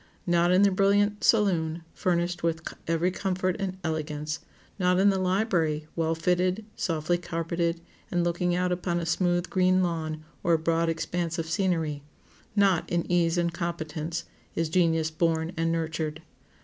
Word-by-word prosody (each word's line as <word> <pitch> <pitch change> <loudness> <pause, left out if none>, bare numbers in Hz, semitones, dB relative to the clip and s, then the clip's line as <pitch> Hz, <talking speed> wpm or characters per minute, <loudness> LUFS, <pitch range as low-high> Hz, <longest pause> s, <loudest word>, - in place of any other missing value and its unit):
Not 175 0 +3
in 185 +2 +5
the 200 - +5
brilliant 205 +2 +2
saloon, 170 -7 +2
furnished 175 -1 0
with 165 -1 -1 0.2
every 165 +2 +1
comfort 185 -1 -1
and 190 -2 -3
elegance; 155 -1 -3 0.4
not 180 0 +3
in 200 +2 +5
the 190 - 0
library, 180 -5 +1
well 165 -1 0
fitted, 180 +5 +1
softly 165 +1 0
carpeted, 170 0 -2 0.3
and 175 -1 +1
looking 175 +1 0
out 180 0 +1
upon 175 -1 -1
a 170 - -3
smooth, 175 +1 +1
green 185 0 +3
lawn 160 -3 -2 0.2
or 170 - +2
a - - +5
broad 165 +1 +1
expanse 170 +1 -2
of 165 - -2
scenery; 165 -4 0 0.5
not 195 -4 +3
in 170 -1 0
ease 170 -1 +2
and 170 -1 +1
competence,—is 165 -1 -4
genius 165 -2 +2
born 160 0 0
and 165 0 0
nurtured. 160 -1 -2
170 Hz, 150 wpm, -27 LUFS, 160-180 Hz, 0.5 s, in